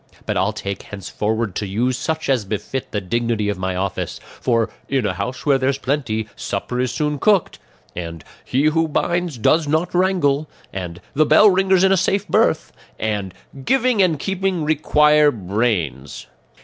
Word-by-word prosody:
But - - -2
I'll 95 +3 +1
take 100 -2 -5
care - - -15
henceforward 105 +2 -2
to 105 - -2
use 120 +6 0
such 160 +5 -3
as 130 -5 +2
befit 105 +6 -4
the 105 - -2
dignity 115 +1 -1
of 100 - -3
my 95 0 -2
office; 95 0 -3 0.2
for 115 -3 +1 0.2
'in 135 -4 +1
a 100 - 0
house 125 +6 -5
where 140 -2 +4
there's 135 +1 +1
plenty, 130 -6 -2
supper 105 +6 -3
is 125 -1 0
soon 150 -1 -1
cooked,' 205 0 +2 0.4
and 85 -3 -6 0.2
'he 135 +3 0
who 160 +2 +2
binds 170 -1 -1
does 155 +7 +2
not 155 +4 0
wrangle,' 175 -6 +1 0.2
and 90 -2 -6
'the 155 +1 +3
bell 200 +7 +7
ringer's 190 0 +3
in 190 - +5
a 195 - +4
safe 195 +3 0
berth,' 215 -8 +1 0.2
and 105 -3 -2 0.3
'giving 255 - +2
and 175 -5 +3
keeping 190 0 -1
require 150 0 +4
brains. 95 - -2
130 Hz, 170 wpm, -20 LUFS, 105-160 Hz, 0.4 s, bell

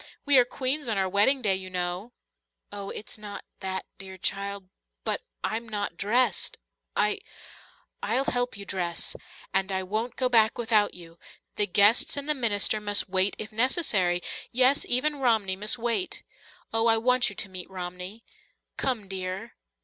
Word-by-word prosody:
We 285 -3 +7
are 245 - +5
queens 260 +2 -1
on 215 - 0
our 190 -1 +1
wedding 210 +8 +3
day, 200 -3 +3
you 190 0 -4
know." 180 +5 -3 0.6
"Oh, 200 -1 -6
it's 215 - -6
not 205 -1 -8
that, 190 -1 -4
dear 190 -1 -8
child 200 +1 -3 0.4
but - - -1 0.2
I'm 230 +1 -3
not 205 -1 -3
dressed 240 +5 +1 0.4
I 420 0 +2 0.4
" - - -28
"I'll 235 +6 +1
help 245 -4 -1
you 200 - -8
dress. 175 -3 -1 0.4
And 195 +1 +1
I 190 0 -1
won't 215 +6 -3
go 255 - +1
back 225 -3 +4
without 225 -3 +2
you. 170 -1 -13 0.4
The 210 - +2
guests 205 +8 +5
and 285 +1 -1
the 300 - +5
minister 215 -5 +2
must 205 -2 +1
wait 190 +1 +3
if 210 - -5
necessary 215 - +2 0.3
yes, 255 +3 +4
even 290 +4 +3
Romney 220 -7 +2
must 210 +5 -1
wait. 240 +10 -2 0.5
Oh, 225 +1 +2
I 225 0 +5
want 250 +2 +3
you 200 - -10
to 195 - -3
meet 185 -2 -6
Romney. 180 +3 -6 0.5
Come, 240 -7 -1
dear." 185 0 -4
210 Hz, 165 wpm, -27 LUFS, 190-245 Hz, 0.6 s, We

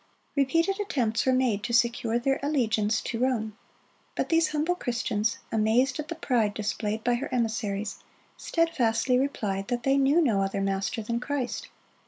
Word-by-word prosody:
Repeated 330 +8 +2
attempts 245 - 0
were - - +5
made 255 -5 +1
to 235 - -4
secure 235 -1 +2
their 270 +3 0
allegiance 220 -7 +1
to 230 - -4
Rome; 230 -4 0 0.6
but - - -1
these 330 -1 +4
humble 310 +3 0
Christians, 230 -8 -1
amazed 225 +6 +2
at 305 - -4
the 335 - -4
pride 235 -9 0
displayed 215 +1 -2
by 245 - +2
her 245 +3 -3
emissaries, 220 -4 -2 0.4
steadfastly 250 -7 +1
replied 205 -8 -2
that 240 -1 -2
they 270 +1 +3
knew 275 +4 +4
no 230 -12 +2
other 195 +1 -1
master 195 +3 -1
than 235 +2 -2
Christ. 275 - -3
240 Hz, 160 wpm, -27 LUFS, 220-275 Hz, 0.6 s, were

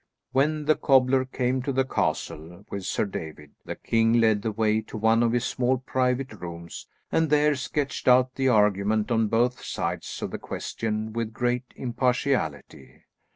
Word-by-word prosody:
When 150 +3 +1
the 155 - +5
cobbler 130 -1 +3
came 130 0 -1
to 140 +2 -2
the 135 0 +1
castle 85 -6 -3
with 100 -2 -5
Sir - - 0
David, 80 -6 -7
the - - -5
king 115 0 +1
led 110 -3 +3
the 110 - -2
way 110 0 +1
to 110 - -9
one 110 +2 +3
of 115 -1 +2
his 120 0 0
small 130 +1 +1
private 130 0 -1
rooms, 85 -3 -8 0.2
and 160 -1 +2
there 150 0 +4
sketched 140 0 -3
out 125 0 +5
the 135 0 0
argument 105 0 +2
on 115 -1 +2
both 120 +3 +1
sides - - -4
of - - -3
the - - -5
question 110 -1 -4
with 115 -1 -3
great 125 +2 -1
impartiality. 125 - -2
120 Hz, 165 wpm, -26 LUFS, 105-130 Hz, 0.2 s, the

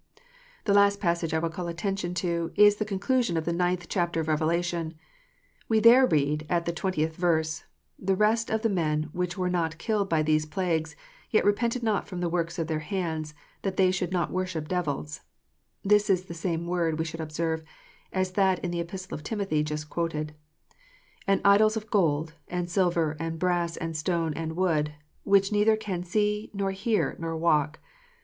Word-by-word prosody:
The 200 - +3
last 200 0 +5
passage 170 -3 0
I 160 - +1
will 165 0 -1
call 175 +1 -5
attention 175 +1 -3
to, 170 -1 -1
is 205 0 +6
the 215 - -1
conclusion 215 -1 0
of 160 - -2
the 170 - 0
ninth 175 0 0
chapter 175 -3 0
of 160 - -2
Revelation. 165 +1 0 0.7
We 220 -1 +4
there 240 +4 +7
read, 150 - +1
at 170 -1 +1
the 170 - 0
twentieth 160 -3 -1
verse: 160 -3 0 0.2
" - - -42
The 190 - +4
rest 220 +3 +2
of 220 +1 -1
the 225 - +3
men 155 -5 0
which 180 +1 -3
were 180 -1 0
not 165 -3 -1
killed 205 +1 -1
by 160 -2 +2
these 155 0 +2
plagues, 160 -2 -1 0.3
yet 215 - +2
repented 235 +4 +1
not 215 -2 0
of 180 - -4
the 175 -1 0
works 170 0 -1
of 165 - -1
their 155 -1 -2
hands, 155 -2 -3 0.3
that 190 -1 -3
they 185 -1 +4
should 180 -1 -2
not 175 -2 0
worship 180 -4 -2
devils 155 -4 -3 0.3
" - - -48
(this 210 +1 +4
is 185 -2 +3
the 170 - -7
same 170 0 -2
word, 170 -2 0
we 160 - -1
should 165 0 -5
observe, 160 +1 -2 0.5
as 185 -1 0
that 190 -1 +3
in 175 - -2
the 175 - -2
Epistle 185 0 -6
to - - -14
Timothy 195 -6 -1
just 150 0 -3
quoted), 155 -2 -3 0.9
"and 195 0 +3
idols 215 +2 +5
of 215 -1 -7
gold, 160 -5 +1
and 175 -1 -3
silver, 170 -4 +1
and 165 0 -3
brass, 175 -1 0
and 165 -1 -4
stone, 165 0 0
and 160 +1 -4
wood: 155 -5 +1 0.3
which 195 0 +4
neither 210 +1 +4
can 190 -5 -4
see, 210 +3 0
nor 195 -1 0
hear, 205 +3 0
nor 165 -1 -3
walk." 155 -2 +2
175 Hz, 190 wpm, -27 LUFS, 160-195 Hz, 0.9 s, there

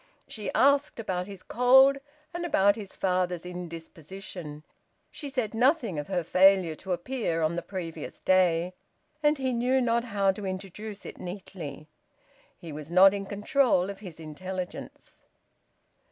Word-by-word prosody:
She 210 -3 -5
asked 280 0 +3
about 185 -4 -2
his 195 -2 -10
cold 265 +3 +5 0.3
and 345 0 -4
about 205 - +3
his 205 -4 -8
father's 180 -2 0
indisposition. 170 -2 -8 0.5
She 290 - -7
said 250 -6 -2
nothing 240 - +2
of 145 - -5
her 180 -3 -1
failure 185 -1 +5
to 190 - -7
appear 175 -3 -1
on 155 +2 +1
the 175 - -2
previous 175 -3 -7
day, 180 -1 +2 0.5
and 300 0 +3
he 260 -2 -1
knew 250 +3 +2
not 235 -1 +1
how 200 -4 +2
to 200 +2 -8
introduce 195 +2 -6
it - - -9
neatly: 175 -5 -8 0.7
he 165 - -9
was 150 0 -8
not 185 +3 +7
in 200 -1 -4
control 205 -2 +2
of 195 - -11
his 180 -6 -10
intelligence. 180 +4 -7
190 Hz, 145 wpm, -28 LUFS, 175-230 Hz, 0.7 s, not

